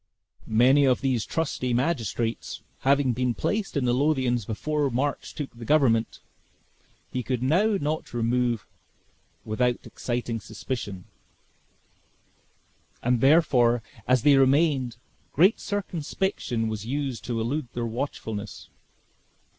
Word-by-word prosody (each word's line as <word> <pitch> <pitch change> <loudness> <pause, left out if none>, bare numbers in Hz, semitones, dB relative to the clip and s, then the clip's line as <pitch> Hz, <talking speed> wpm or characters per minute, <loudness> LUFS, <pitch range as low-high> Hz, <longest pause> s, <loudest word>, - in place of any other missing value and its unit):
Many 130 +6 +5
of 130 -2 +2
these 130 -5 0
trusty 130 -6 -1
magistrates 120 -4 -2 0.2
having 135 -1 +3
been 125 0 0
placed 205 -6 -1
in 135 - +1
the 120 - +2
Lothians, 130 -5 +1
before 145 +6 -1
March 135 +4 -2
took 145 -5 -6
the 120 - -9
government, 115 -4 +2 0.9
he 125 - -2
could 125 -1 -2
not 195 +9 +2
now 155 +2 -1
remove 120 -1 0
them - - -31 0.8
without 120 +3 0
exciting 120 -2 -3
suspicion; 105 -3 -6 2.0
and 125 -1 +2
therefore, 130 -6 +4 0.2
as 130 -2 +3
they 145 -2 +6
remained, 135 -3 +3 0.4
great 185 +9 +4
circumspection 185 - -2
was 110 -2 -4
used 130 -1 -3
to 120 -2 -2
elude 130 +5 -2
their 120 -1 -2
watchfulness. 110 -4 -5
125 Hz, 115 wpm, -26 LUFS, 115-145 Hz, 2.0 s, they